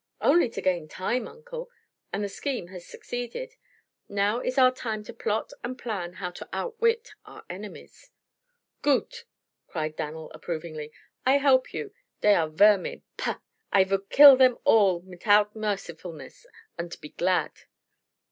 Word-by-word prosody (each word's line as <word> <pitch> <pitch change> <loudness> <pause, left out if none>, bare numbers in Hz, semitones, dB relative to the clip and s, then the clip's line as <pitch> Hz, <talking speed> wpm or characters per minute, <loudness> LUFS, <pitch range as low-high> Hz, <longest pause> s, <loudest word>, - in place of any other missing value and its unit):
"Only 305 -3 +4
to - - -6
gain 175 -4 0
time, 220 +9 -2
Uncle. 485 +1 -9 0.4
And 205 - -2
the - - -1
scheme 240 -3 -4
has 180 -2 -10
succeeded. 245 - -6 0.6
Now 205 +3 +1
is 255 +1 -3
our 255 -1 +7
time 220 -4 -4
to - - -10
plot 210 +1 -2
and 250 +2 -4
plan 195 -8 -4
how 180 -1 -5
to - - -10
outwit 465 -1 -1
our - - -13
enemies." 200 +3 -10 0.7
"Goot!" 470 - 0 0.4
cried 155 -2 -3
Dan'l 155 0 -6
approvingly. 155 -3 -6 0.3
"I 265 +2 +5
help 270 -2 +3
you. 435 -2 -6 0.3
Dey 210 - +6
are 160 -5 +2
vermin 200 +4 +3
pah! - - -3 0.3
I 195 - +6
vould 195 +1 -2
kill 280 -2 +10
dem 255 -2 +5
all 195 -6 +4
mitout 205 +3 +2
mercifulness, 180 - -6 0.3
unt 170 0 -5
be 150 - -10
glad!" 180 +3 0
205 Hz, 145 wpm, -27 LUFS, 175-255 Hz, 0.7 s, kill